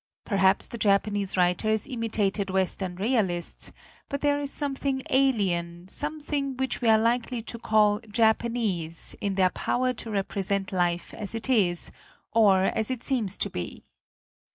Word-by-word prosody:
Perhaps 195 -2 +2
the 235 - -6
Japanese 200 -1 +1
writers 195 +4 +2
imitated 220 -6 -1
Western 190 -1 -1
realists, 190 -5 0 0.4
but 280 - -3
there 290 0 +2
is 285 -1 -1
something 275 -2 -1
alien, 185 -10 +1
something 290 -2 -2
which 265 -1 -2
we 235 - +3
are 220 - +7
likely 235 +1 0
to 235 0 -7
call 210 -2 +3
Japanese, 220 -7 0
in 200 -1 -1
their 185 -1 +3
power 255 +1 0
to 230 -1 -7
represent 195 -1 -1
life 175 -2 -1
as 210 +1 -6
it 225 +4 -2
is, 180 -8 +1 0.4
or 200 -4 +5
as 220 +2 0
it 255 -2 -3
seems 220 -7 0
to - - -1
be. 90 - -6
215 Hz, 145 wpm, -27 LUFS, 190-245 Hz, 0.4 s, are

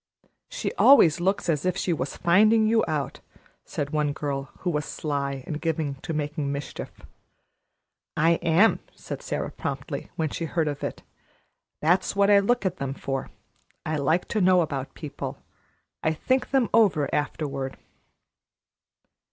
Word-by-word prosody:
"She - - -3
always 170 - +7
looks 190 +2 0
as 150 -4 +1
if 185 0 0
she 180 - 0
was 140 -3 -4
finding 215 +5 +4
you 225 +1 +3
out," 150 -5 -2 0.5
said 145 0 -4
one 150 -1 0
girl, 140 -2 -3
who 180 - 0
was 150 -2 -1
sly 140 -4 -3
and 150 0 -5
given 160 -3 -1
to - - -5
making 150 -1 -2
mischief. 140 +1 -5 1.3
"I 165 +2 +3
am," 175 +6 +4 0.2
said - - -7
Sara - - -3
promptly, - - -5
when 160 -2 -1
she 165 - -4
heard 165 -1 0
of 145 -1 -4
it. - - -4 0.8
"That's 175 +6 +2
what 200 +1 +4
I 200 - +7
look 240 +3 +1
at 185 -1 -1
them 135 0 -3
for. 135 -2 -4 0.6
I 155 0 -1
like 160 +5 +1
to 215 - 0
know 180 -1 +5
about 140 -4 -4
people. 145 -2 -6 0.6
I 160 - +1
think 260 +10 0
them 265 -4 +2
over 185 -10 +4
afterward." 140 -2 -2
160 Hz, 150 wpm, -26 LUFS, 145-185 Hz, 1.3 s, always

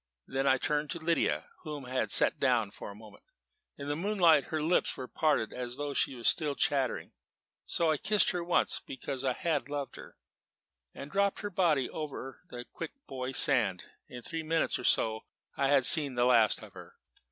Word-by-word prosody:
Then 135 +1 -2
I 130 - +4
turned 150 +2 -1
to - - -3
Lydia, 165 0 -1
whom 150 -4 -7
I 125 - -10
had 130 - -1
set - - +5
down - - +1
for - - -9
the 100 - -10
moment. 110 0 -15 0.5
In 140 - -7
the 145 - -1
moonlight 170 -4 +3
her 155 - -3
lips 170 +3 +1
were 130 - -6
parted 150 -8 0
as 125 -1 -5
though 145 +1 -4
she 135 - 0
were 120 - -10
still 150 +2 +2
chattering; 135 -4 0 0.6
so 165 -2 +1
I 155 - +1
kissed 210 +6 +2
her 175 -1 -3
once, 175 0 +1
because 130 0 -5
I 130 -2 +1
had 150 0 -2
loved 145 -1 -5
her, - - -13 0.8
and 140 +2 -9
dropped 200 +2 0
her 205 -1 -5
body 160 -8 +2
over 140 -4 -7
into - - -12
the 120 0 -7
Quick 165 - -8
Boy 130 -1 -5
Sand. 105 -8 +1 0.2
In 125 -1 -10
three 165 +4 -5
minutes 160 +1 0
or - - -6
so 110 -1 +1 0.3
I 140 - +1
had 135 -2 +3
seen 145 -4 +5
the 120 0 +2
last 115 -3 +4
of - - -13
her. - - -13
140 Hz, 200 wpm, -30 LUFS, 125-160 Hz, 0.8 s, set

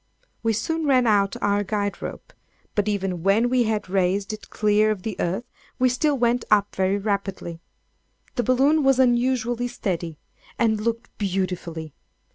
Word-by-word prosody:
We 225 -1 +1
soon 315 +9 -1
ran 255 -3 +4
out 200 -3 +3
our 205 0 +2
guide 205 0 -2
rope; - - -7 0.4
but 205 0 0
even 195 -4 -1
when 210 +7 +3
we 250 -2 +3
had 215 -2 -1
raised 195 +2 0
it 215 - -9
clear 210 0 +2
of 205 -4 -2
the 220 -3 -3
earth, 190 +7 -1 0.3
we 255 0 +3
still 280 +3 +1
went 240 0 +2
up 205 -1 +3
very 190 +1 +1
rapidly. 195 -4 -3 0.7
The 245 - 0
balloon 270 +5 +3
was 270 -1 +4
unusually 245 -1 +2
steady, 175 -9 -3 0.4
and 220 -2 +2
looked 230 +1 -3
beautifully. 180 -5 -3
215 Hz, 155 wpm, -24 LUFS, 195-245 Hz, 0.7 s, ran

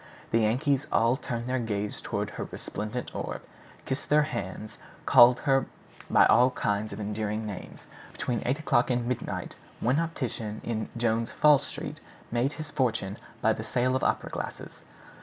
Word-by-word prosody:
The 115 - +4
Yankees 130 +6 +1
all 115 +2 +4
turned 120 -3 -4
their 130 +1 0
gaze 105 -3 -3
toward - - -3
her - - -5
resplendent 110 +4 -5
orb, - - -4 0.4
kissed 130 +1 -3
their 150 +1 +5
hands, 110 -6 -5 0.3
called 120 +1 +7
her 135 -2 +2 0.4
by - - +6
all 125 +1 +6
kinds 105 -3 -1
of 100 - -6
endearing 105 +1 -2
names. 100 -3 -8 0.3
Between 120 -2 -2
eight 130 +3 +1
o'clock 130 -6 +2
and 120 -1 +1
midnight 125 0 -3 0.3
one 130 +6 +2
optician 125 -10 -3
in 110 -2 -3
Jones' 115 -1 +1
Fall 150 -2 +5
Street - - -6 0.3
made 120 +5 +1
his 155 -2 -7
fortune 110 -7 0 0.3
by - - +5
the - - -5
sale 125 +1 +1
of 130 - 0
opera - - 0
glasses. - - -6
120 Hz, 160 wpm, -28 LUFS, 110-130 Hz, 0.4 s, called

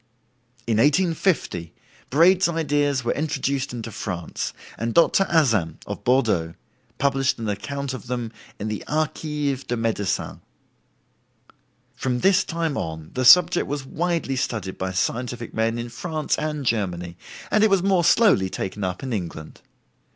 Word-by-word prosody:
In 115 -2 +1
1850 150 - +1 0.3
Braid's 175 +5 +5
ideas 145 -5 0
were 120 - 0
introduced 140 -2 -1
into 115 -2 -6
France, 90 -6 -4 0.2
and 115 0 -3
Dr. 170 +3 +5
Azam, 115 - +2
of - - -6
Bordeaux, 110 -11 +1 0.4
published 135 -1 +1
an 115 -2 -4
account 140 +7 -3
of 130 - -8
them 120 -2 -3 0.3
in 105 - -4
the 105 -1 -4
"Archives 150 -2 -1
de 120 - -3
Medicine." 115 -3 -2 1.5
From 125 -2 -2
this 195 0 +4
time 165 -3 -2
on 80 -1 -5
the 130 - -1
subject 175 +6 +7
was 140 -1 -4
widely 165 -2 -1
studied 110 -7 -3
by 95 0 -2
scientific 120 +5 -2
men 115 +1 0
in 120 0 -4
France 155 +5 -2
and 150 -2 -3
Germany, 90 -7 -1 0.4
and 215 - +4
it 220 - +5
was 195 -2 +3
more 190 -3 +3
slowly 175 - +4
taken 95 +2 -4
up 90 +3 -3
in 130 -2 -3
England. 85 -6 -6
130 Hz, 145 wpm, -23 LUFS, 110-155 Hz, 1.5 s, subject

